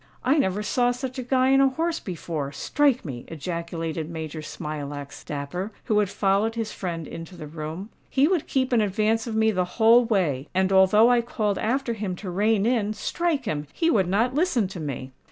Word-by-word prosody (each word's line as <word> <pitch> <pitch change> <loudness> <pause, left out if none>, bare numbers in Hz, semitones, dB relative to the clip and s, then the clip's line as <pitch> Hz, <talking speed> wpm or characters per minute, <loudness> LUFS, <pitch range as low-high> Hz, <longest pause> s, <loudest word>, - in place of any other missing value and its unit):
"I 275 +5 +3
never 200 -3 0
saw 245 +3 +2
such 255 +1 -4
a - - -1
Guy 260 +1 +2
on 270 - +5
a 270 - +5
horse 325 +4 -1
before—strike 175 - -1
me!" 125 -5 -6
ejaculated 165 0 -4
Major 160 -1 -5
Smilax 145 -2 -6
Dapper, 150 +8 -4
who 210 -1 +2
had 205 -2 +1
followed 200 +3 +1
his 225 -2 -3
friend 165 -4 -4
into 165 +2 -9
the 155 - -7
room. 160 +6 -6 0.2
"He 275 +2 +3
would 355 -3 0
keep 260 -1 0
in 230 - +4
advance 215 +3 +1
of 225 - -3
me 220 0 +3
the 185 -3 +1
whole 230 +2 +6
way; 170 - 0
and 190 +1 +2
although 210 +5 +6
I 240 -1 +4
called 215 -4 -1
after 250 +2 0
him 200 -4 -3
to 185 0 -6
rein 205 +2 +2
in—strike 245 - 0
him!—he 155 - -1
would 190 -6 +2
not 225 +7 +1
listen 290 - +2
to 185 - -7
me." 135 -3 -5
205 Hz, 190 wpm, -25 LUFS, 165-245 Hz, 0.2 s, whole